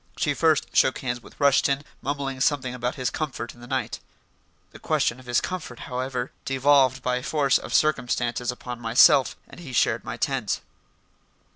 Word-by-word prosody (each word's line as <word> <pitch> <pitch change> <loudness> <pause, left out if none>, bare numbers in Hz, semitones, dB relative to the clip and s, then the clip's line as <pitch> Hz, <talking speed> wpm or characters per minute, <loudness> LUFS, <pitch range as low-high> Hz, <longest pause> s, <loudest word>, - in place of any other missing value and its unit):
She 145 - +1
first 160 0 +1
shook 130 - +4
hands 120 -2 -3
with - - -17
Rushton, 140 0 +3 0.2
mumbling 135 -2 -3
something 130 -3 +1
about 125 +2 -3
his 130 -3 -2
comfort 130 -7 -4
in 120 - -18
the 120 - -11
night. - - -2 0.7
The - - -13
question 120 - 0
of 130 - -16
his 120 - +2
comfort, 175 -10 -6
however, 125 0 -4
devolved 135 -1 +3
by 125 0 0
force 140 -1 +2
of - - -9
circumstances 125 -4 +1
upon 125 -1 -8
myself, 120 +3 +5
and - - -13
he 145 -7 -9
shared 115 -1 +2
my 110 +1 -6
tent. 125 -4 -1
130 Hz, 165 wpm, -25 LUFS, 125-140 Hz, 0.7 s, myself